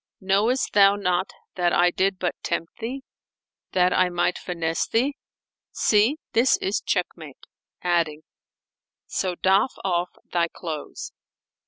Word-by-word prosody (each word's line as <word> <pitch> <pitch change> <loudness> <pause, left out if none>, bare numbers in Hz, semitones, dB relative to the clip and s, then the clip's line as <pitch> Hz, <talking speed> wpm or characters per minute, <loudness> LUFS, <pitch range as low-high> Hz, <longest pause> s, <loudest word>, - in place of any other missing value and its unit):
Knowest 205 +7 +1
thou 200 0 +6
not 185 -2 0 0.2
that 175 -1 +1
I 175 0 +4
did 190 +1 0
but 180 -1 -1
tempt 165 - -3
thee, 255 +4 -5 0.7
that 180 0 +3
I 185 0 +3
might 175 0 0
finesse 165 -2 -2
thee? 265 +5 +1 0.5
See: 220 +8 +2 0.2
this 240 +3 +4
is 195 +2 -1
check 180 -2 +1
mate!" 155 -5 -12 0.4
adding, 165 -3 0 0.8
"So 185 -2 -2
doff 195 +7 +2
off 180 -2 0 0.2
thy 170 -1 +2
clothes." 160 -3 -7
185 Hz, 130 wpm, -24 LUFS, 175-205 Hz, 0.8 s, thou